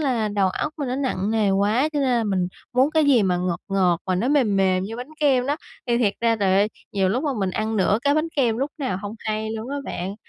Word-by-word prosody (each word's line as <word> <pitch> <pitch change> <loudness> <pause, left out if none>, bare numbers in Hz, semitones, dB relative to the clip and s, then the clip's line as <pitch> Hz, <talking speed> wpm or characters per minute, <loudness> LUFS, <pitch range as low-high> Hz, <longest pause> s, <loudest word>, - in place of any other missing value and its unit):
là 245 -7 0
đầu 200 -2 +1
óc 300 +11 -3
mình 280 - -2
nó 255 - -2
nặng 220 -7 -1
nề 215 -3 +2
quá 210 +9 +2
cho 295 - -1
nên 270 - +1
là 235 -2 +2
mình 185 -3 0 0.2
muốn 260 +4 +3
cái 315 -1 +3
gì 270 -6 +4
mà 180 -2 +1
ngọt 180 -1 -2
ngọt 185 -3 +2
mà 185 - +1
nó 220 +8 0
mềm 250 -9 +2
mềm 185 -1 +2
như 225 +3 -6
bánh 250 +4 -7
kem 265 -4 +3
đó, 290 +2 0 0.3
thì 235 -1 +1
thiệt 210 -4 +2
ra 230 -1 +2
trời 195 -2 +2
ơi, 200 +2 +3 0.2
nhiều 190 -2 +1
lúc 245 +8 0
mà 290 - +1
mình 190 -2 0
ăn 220 +3 -2
nửa 200 +1 +2
cái 285 0 +3
bánh 310 +2 +1
kem 235 -5 +2
lúc 275 +2 -1
nào 255 -10 -2
hông 205 +1 -5
hay 215 0 -3
luôn 225 +2 -5
á 285 - -3
bạn. 185 +3 -4
220 Hz, 275 wpm, -23 LUFS, 195-260 Hz, 0.3 s, gì